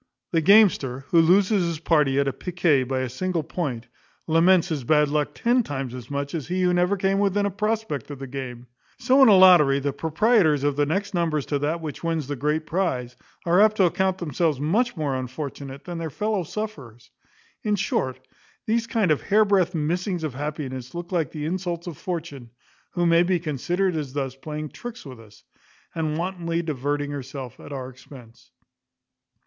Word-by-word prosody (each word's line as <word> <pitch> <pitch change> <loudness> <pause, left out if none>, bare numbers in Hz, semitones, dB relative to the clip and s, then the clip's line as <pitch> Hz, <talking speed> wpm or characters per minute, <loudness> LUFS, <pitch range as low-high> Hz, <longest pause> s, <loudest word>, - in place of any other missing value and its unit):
The 165 - +2
gamester, 165 - +4
who 170 - +5
loses 190 +4 +4
his 170 -2 -2
party 150 -4 +2
at 140 -2 -1
piquet 165 -7 +1
by 130 +1 -1
a 130 - -2
single 170 +6 -2
point, 135 -8 -4 0.4
laments 170 +2 +4
his 150 -5 -2
bad 150 +3 +3
luck 150 0 -1
ten 245 +2 +2
times 135 - -5
as 125 -2 -9
much 140 0 -3
as 155 -6 -4
he 185 +2 -1
who 180 0 +3
never 180 +3 +2
came 195 +1 +1
within 200 0 +1
a 200 - 0
prospect 210 - -2
of 145 - -7
the 135 - -7
game. 125 -2 -7 0.3
So 265 +2 +3
in 265 - +8
a 205 - +8
lottery, 175 -7 +7
the 140 0 -2
proprietors 160 - +2
of 145 -1 +1
the 145 0 +1
next 200 +6 -2
numbers 160 -5 0
to 145 - -1
that 155 +4 -1
which 155 0 -7
wins 165 -3 -1
the 145 +2 -4
great 150 +4 -1
prize 130 -9 -2 0.3
are 175 +3 +4
apt 215 0 +4
to 195 - +4
account 190 +2 +1
themselves 160 -3 -1
much 210 - 0
more 145 -4 -1
unfortunate 135 +1 -6
than 175 -2 -6
their 165 -1 -3
fellow 210 +6 -1
sufferers. 150 - -7 0.5
In 210 -1 0
short, 130 -9 -1 0.5
these 230 0 0
kind 220 -7 +1
of 150 - +1
hairbreadth 200 -4 +2
missings 175 +3 -1
of 155 -4 -3
happiness 135 -2 -5
look 175 +1 -6
like 165 -7 0
the 150 -1 -5
insults 175 0 -3
of 175 -3 -6
Fortune, 155 -8 -6 0.4
who 175 -1 0
may 170 0 +5
be 175 0 +1
considered 175 +4 -1
as 145 -4 -4
thus 135 -2 -3
playing 150 +2 -6
tricks 240 +3 -9
with 130 -4 -10
us, 105 -2 -17 0.5
and 155 -2 -2
wantonly 170 -1 -2
diverting 145 -1 -2
herself 135 -3 -7
at - - -11
our 130 -2 -5
expense. 125 -3 -15
160 Hz, 185 wpm, -24 LUFS, 140-185 Hz, 0.5 s, in